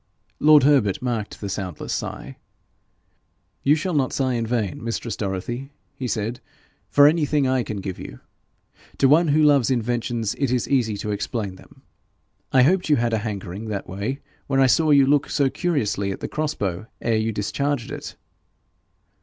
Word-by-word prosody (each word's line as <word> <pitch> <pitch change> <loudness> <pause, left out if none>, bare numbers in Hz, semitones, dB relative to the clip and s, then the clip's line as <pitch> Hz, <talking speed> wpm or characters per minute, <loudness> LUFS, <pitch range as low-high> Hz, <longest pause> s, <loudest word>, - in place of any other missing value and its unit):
Lord 150 -2 +6
Herbert 135 -9 +3
marked 120 -4 -3
the 100 - -3
soundless 95 -5 -4
sigh. - - -5 1.2
'You 145 +2 +4
shall 175 +4 -2
not 135 -4 +1
sigh 130 -2 0
in 115 -1 -1
vain, 110 -4 -2
mistress 115 0 -3
Dorothy,' 110 +7 -4 0.3
he 130 - -4
said, 115 +2 -2 0.5
'for 145 - +6
anything 150 -2 +3
I 130 -1 +2
can 105 -4 -5
give 95 -1 -5
you. - - -9 0.8
To 135 - +4
one 160 +5 +5
who 155 +1 +3
loves 140 -5 +4
inventions 120 -3 -1
it 135 -3 +1
is 125 -2 0
easy 115 -6 +1
to 105 +1 -4
explain 105 -1 -3
them. - - -19 0.7
I 130 -1 +5
hoped 180 +4 +2
you 150 - +5
had 120 -2 0
a 110 - +2
hankering 100 -1 -5
that 100 -3 -4
way 105 +9 -4 0.3
when 135 -1 +1
I 135 - +6
saw 155 +4 +3
you 140 -2 +6
look 145 +1 +2
so 140 -3 +1
curiously 105 - -1
at 95 - -6
the - - -4
cross 155 0 -2
bow 95 +2 -3
ere 115 -1 +1
you 110 +1 0
discharged 120 +5 -2
it.' - - -7
120 Hz, 175 wpm, -23 LUFS, 105-140 Hz, 1.2 s, Lord